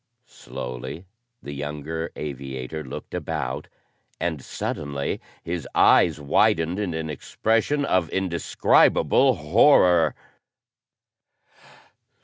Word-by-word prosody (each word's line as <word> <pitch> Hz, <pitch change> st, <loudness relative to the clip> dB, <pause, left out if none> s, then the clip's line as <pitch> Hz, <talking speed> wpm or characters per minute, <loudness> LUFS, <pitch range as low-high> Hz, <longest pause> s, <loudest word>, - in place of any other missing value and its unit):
Slowly, 65 Hz, -, -8 dB, 0.4 s
the 70 Hz, -, -7 dB
younger 75 Hz, +3 st, -5 dB
aviator 70 Hz, +1 st, -6 dB
looked 65 Hz, -, -9 dB
about, 70 Hz, -6 st, -3 dB, 0.5 s
and 80 Hz, -5 st, -2 dB
suddenly 70 Hz, -1 st, -4 dB, 0.2 s
his 85 Hz, 0 st, -4 dB
eyes -, -, +5 dB
widened 80 Hz, +5 st, +2 dB
in 95 Hz, -6 st, -2 dB
an 80 Hz, -1 st, -3 dB
expression 115 Hz, -, 0 dB
of 90 Hz, -, +1 dB
indescribable 95 Hz, -2 st, +3 dB
horror. 90 Hz, -, +4 dB
80 Hz, 85 wpm, -24 LUFS, 70-90 Hz, 0.5 s, eyes